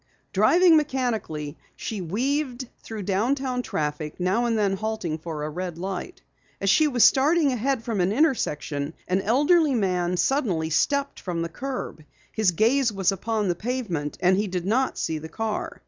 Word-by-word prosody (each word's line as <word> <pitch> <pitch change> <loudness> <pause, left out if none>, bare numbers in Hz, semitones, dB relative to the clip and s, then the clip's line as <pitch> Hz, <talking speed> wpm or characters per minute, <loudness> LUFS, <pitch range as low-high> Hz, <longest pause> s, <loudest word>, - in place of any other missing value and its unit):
Driving 350 -2 +5
mechanically, 230 - -2 0.2
she 215 -4 -5
weaved 255 - -2
through 220 -2 -6
downtown 250 +7 0
traffic, 150 -6 -3
now 190 +7 +1
and 230 -2 +1
then 200 -2 +2
halting 200 -6 -3
for 155 -2 -5
a 150 - -2
red 175 0 -5
light. 190 - -5 0.4
As 195 0 +2
she 310 +5 +4
was 250 -5 +3
starting 295 +2 +4
ahead 255 0 -1
from 225 -5 -1
an 180 +2 +2
intersection, 160 - 0
an 185 +2 +1
elderly 290 - +3
man 180 -4 0
suddenly 180 - 0
stepped 280 - +1
from 170 -3 -3
the 170 - -4
curb. 250 - -5 0.3
His 215 -4 +2
gaze 230 +8 +2
was 195 -2 +1
upon 210 +2 -1
the 175 - +2
pavement, 190 - -3
and 185 +1 +4
he 210 +1 0
did 180 -2 -3
not 250 +6 +1
see 160 -1 -2
the 160 +1 -9
car. 220 +4 -4
215 Hz, 165 wpm, -25 LUFS, 175-260 Hz, 0.4 s, Driving